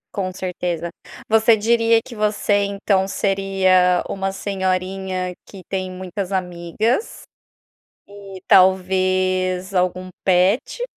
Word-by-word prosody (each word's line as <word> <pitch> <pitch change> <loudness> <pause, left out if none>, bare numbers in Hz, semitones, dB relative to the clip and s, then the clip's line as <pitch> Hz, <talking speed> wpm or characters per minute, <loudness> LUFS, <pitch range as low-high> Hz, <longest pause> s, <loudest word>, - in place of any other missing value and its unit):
Com 185 -2 -2
certeza, 175 -2 -4 0.4
você 220 0 +4
diria 230 +1 +3
que 235 +1 -12
você 210 -1 +1
então 200 -1 0
seria 190 -2 +2
uma 195 0 -3
senhorinha 190 -1 -2
que 190 -3 -13
tem 190 -1 -3
muitas 185 +1 -6
amigas. 185 - -2 0.8
E 200 -2 -11
talvez 185 0 +2
algum 185 0 -1
pet? 190 - +1
190 Hz, 100 wpm, -20 LUFS, 185-200 Hz, 0.8 s, você